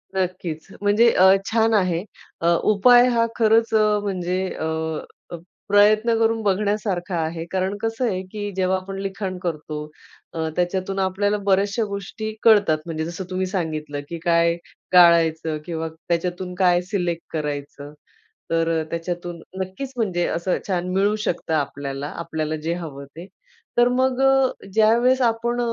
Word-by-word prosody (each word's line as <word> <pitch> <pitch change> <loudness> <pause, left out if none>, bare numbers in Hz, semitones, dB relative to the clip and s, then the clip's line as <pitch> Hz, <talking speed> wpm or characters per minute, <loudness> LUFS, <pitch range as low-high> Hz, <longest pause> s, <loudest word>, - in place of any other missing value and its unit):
नक्कीच 180 -4 -3
म्हणजे 210 +4 +4
अ, 190 +1 +6
छान 225 0 +2
आहे. 185 -4 +1 0.4
अ, 170 - +1 0.2
उपाय 245 +4 +6
हा 230 0 +3
खरंच 225 0 +3
म्हणजे 200 -4 +1 0.2
अ, 160 - -2 1.0
प्रयत्न 215 +3 +4
करून 225 0 +2
बघण्यासारखा 200 -2 -1
आहे. 165 0 -2
कारण 190 +1 -1
कसं 225 +2 -1
आहे 185 -3 -1
की 205 -1 -4
जेव्हा 190 0 +1
आपण 195 +1 -7
लिखाण 195 -1 -4
करतो 155 -2 -4 0.5
अ, 160 -1 -2
त्याच्यातून 185 +2 -1
आपल्याला 200 +2 0
बऱ्याचश्या 200 +3 +2
गोष्टी 205 +2 -5
कळतात 205 -8 +5
म्हणजे 160 -1 -3
जसं 175 +3 -5
तुम्ही 185 0 -1
सांगितलं 155 -6 -3
की 170 - -5
काय 170 0 +3 0.4
टाळायचं 165 -3 +5
किंवा 165 -1 -3 0.2
त्याच्यातून 180 +2 -2
काय 180 -1 +3
सिलेक्ट 175 -4 -1
करायचं 145 -1 -5 0.6
तर 165 -1 +1
त्याच्यातून 170 0 -5 0.2
नक्कीच 190 +9 -5
म्हणजे 180 -6 0
असं 170 +2 -1
छान 180 -2 -1
मिळू 200 +2 +2
शकतं 170 -5 -2
आपल्याला, 140 -1 -3
आपल्याला 160 -1 -4
जे 165 +1 -1
हवं 150 -5 -7
ते. 160 +5 -11 0.5
तर 240 0 +6
मग 260 +1 +1 0.5
ज्यावेळेस 235 +4 +4
आपण 235 +1 0
185 Hz, 135 wpm, -22 LUFS, 165-210 Hz, 1.0 s, अ